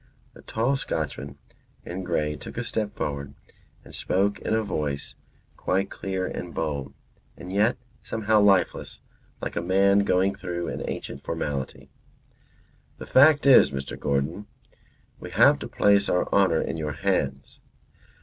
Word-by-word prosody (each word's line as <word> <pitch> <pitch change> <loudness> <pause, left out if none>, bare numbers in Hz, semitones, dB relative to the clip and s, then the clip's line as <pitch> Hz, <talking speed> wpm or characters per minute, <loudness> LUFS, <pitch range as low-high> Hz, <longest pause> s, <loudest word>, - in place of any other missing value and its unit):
The - - -15
tall 120 +5 0
Scotchman 70 - -4 0.5
in 90 +2 -5
grey 75 -4 -1
took 75 - -10
a 120 - -1
step 110 -2 -3
forward 70 -1 -4 0.5
and - - -14
spoke 100 +2 0
in 110 - -1
a 110 - +1
voice 75 -8 -3 0.4
quite 95 +1 -1
clear 95 -1 -3
and 90 -2 -6
bold, 70 -4 -3 0.4
and 90 - -8
yet 105 +4 +2 0.2
somehow 110 -1 +1
lifeless, 100 -2 +2 0.4
like - - -4
a - - 0
man 100 +3 +3
going 95 -1 +2
through 90 -3 -4
an - - -5
ancient - - -6
formality. 70 -2 -4 1.1
"The - - -8
fact 145 +2 +5
is, 135 -2 +7
Mr. 70 -1 -5
Gordon, 70 +9 -2 0.7
we - - -8
have - - +5
to - - -6
place 100 0 +3
our 90 - +1
honour 95 -5 +4
in - - -4
your 75 -2 -3
hands. 70 -6 -2
95 Hz, 145 wpm, -25 LUFS, 75-100 Hz, 1.1 s, is